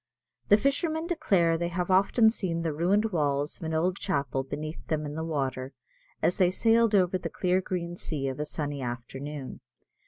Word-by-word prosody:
The 205 - +7
fishermen 310 - 0
declare 195 - +2
they 170 - 0
have 175 +1 -2
often 210 +4 +5
seen 170 -7 -2
the 160 -2 -1
ruined 200 +8 +2
walls 145 -3 0
of - - -11
an 160 0 -2
old 180 +4 +1
chapel 140 -10 -1
beneath 150 +4 -6
them 155 -1 -1
in 145 - -5
the 160 +1 -3
water, 135 -4 -2 0.5
as 175 - +2
they 185 -2 +4
sailed 225 +3 +3
over 185 -1 +3
the - - -4
clear 185 0 +1
green 175 -2 -4
sea 145 -5 -3
of 135 +1 -4
a 150 - -1
sunny 145 -2 -4
afternoon. 130 +3 -6
170 Hz, 185 wpm, -28 LUFS, 145-190 Hz, 0.5 s, The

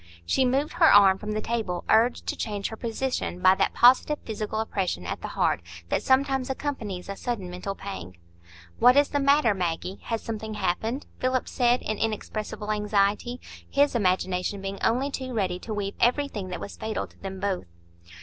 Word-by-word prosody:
She 260 - +2
moved 270 +4 +1
her 340 -1 +6
arm 195 -2 +7
from 210 0 -4
the 215 - -1
table, 215 -7 -2
urged 230 +3 +3
to - - -2
change 205 -3 -3
her 220 - -6
position 230 -4 -3
by 185 +1 +6
that - - 0
positive 260 +4 +5
physical 215 0 -3
oppression 190 - -2
at - - -4
the - - -4
heart - - 0 0.3
that - - +1
sometimes 265 -1 +2
accompanies 235 -10 -4
a 200 - -4
sudden 200 -6 -4
mental 185 +2 -5
pang. 90 - -8 0.6
"What 250 +2 +6
is 285 0 +5
the 285 - 0
matter, 280 -4 +4
Maggie? 180 0 -3
Has 230 -2 -2
something 220 -1 -5
happened?" 220 +8 -1
Philip 255 0 0
said, 245 -1 +2
in 215 -1 -2
inexpressible 215 -1 -3
anxiety, 210 +3 +1 0.3
his 285 +1 +3
imagination 185 -2 0
being 195 0 -5
only 260 +5 +1
too 260 -2 -5
ready 185 -4 0
to 220 - -8
weave 205 -2 -2
everything 240 -6 +1
that 180 - -5
was - - -7
fatal 220 0 -3
to - - -22
them 190 -1 -6
both. 190 - -2
215 Hz, 180 wpm, -26 LUFS, 195-250 Hz, 0.6 s, arm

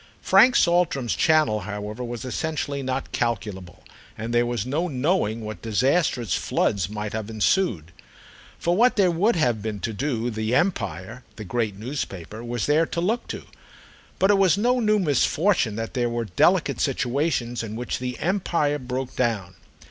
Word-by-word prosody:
Frank 255 - +6
Saltram's 170 -8 +2
channel, 155 -10 +3
however, 105 +3 -5
was 120 0 -5
essentially 145 +1 -3
not 130 0 -3
calculable, 105 -8 -3 0.3
and 115 +2 -4
there 120 0 +3
was 120 -3 -2
no 150 +7 -1
knowing 130 - 0
what 110 0 -7
disastrous 125 - +1
floods 95 -3 0
might 105 0 -5
have 110 -1 -4
ensued. 110 - 0 0.7
For 175 +1 0
what 245 +5 +4
there 190 -4 +4
would 195 +7 +2
have 120 -9 +1
been 105 -1 -4
to 115 - -3
do 120 0 -2
The 110 +2 -1
Empire, 120 - -1
the 110 - -7
great 110 0 -2
newspaper, 110 - -5
was 120 -1 -2
there 155 +3 +3
to - - -3
look 220 +8 -1
to; - - -6 0.7
but 195 - +4
it 200 - +3
was 190 -1 +4
no 245 +4 +2
new 215 -2 +3
misfortune 155 - +2
that 115 0 -4
there 120 -2 0
were 120 0 -2
delicate 90 - +2
situations 125 -2 0
in 110 -1 -6
which 120 +2 -3
The 125 -1 -4
Empire 170 - 0
broke 130 0 -4
down. 105 -7 -1
125 Hz, 165 wpm, -24 LUFS, 110-165 Hz, 0.7 s, Frank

